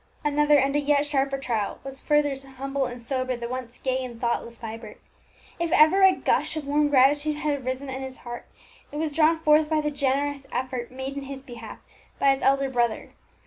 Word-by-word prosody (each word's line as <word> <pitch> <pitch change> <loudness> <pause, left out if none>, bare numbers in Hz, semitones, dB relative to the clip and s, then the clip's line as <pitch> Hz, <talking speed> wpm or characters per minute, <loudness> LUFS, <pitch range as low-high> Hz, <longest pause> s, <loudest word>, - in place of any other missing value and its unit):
Another 295 0 +4
and 275 +1 +2
a - - +4
yet 290 0 +2
sharper 275 -1 0
trial 230 -6 -2
was 270 0 -6
further 295 -1 +2
to 270 0 -10
humble 270 0 -2
and 245 0 -8
sober 255 +1 -2
the 235 0 -5
once 250 -1 -6
gay 260 0 -1
and 240 -2 -8
thoughtless 235 0 -2
Vibert. 225 -1 -8 0.6
If 340 -1 -1
ever 315 +6 +6
a 380 0 +8
gush 345 - 0
of 305 - -4
warm 295 +1 +2
gratitude 290 +2 +4
had 295 -2 -1
arisen 260 +2 -3
in 265 0 -5
his 265 -1 -7
heart, 240 0 -7 0.4
it 295 - -6
was 310 0 -1
drawn 325 +1 +4
forth 305 -1 +4
by 315 -1 +2
the 300 0 -1
generous 280 0 -1
effort 255 -1 -3
made 265 +2 -6
in 280 - -4
his 270 0 -7
behalf 235 -4 -9 0.4
by 275 - +4
his 270 - -1
elder 275 0 +2
brother. 240 -3 0
275 Hz, 205 wpm, -25 LUFS, 255-295 Hz, 0.6 s, a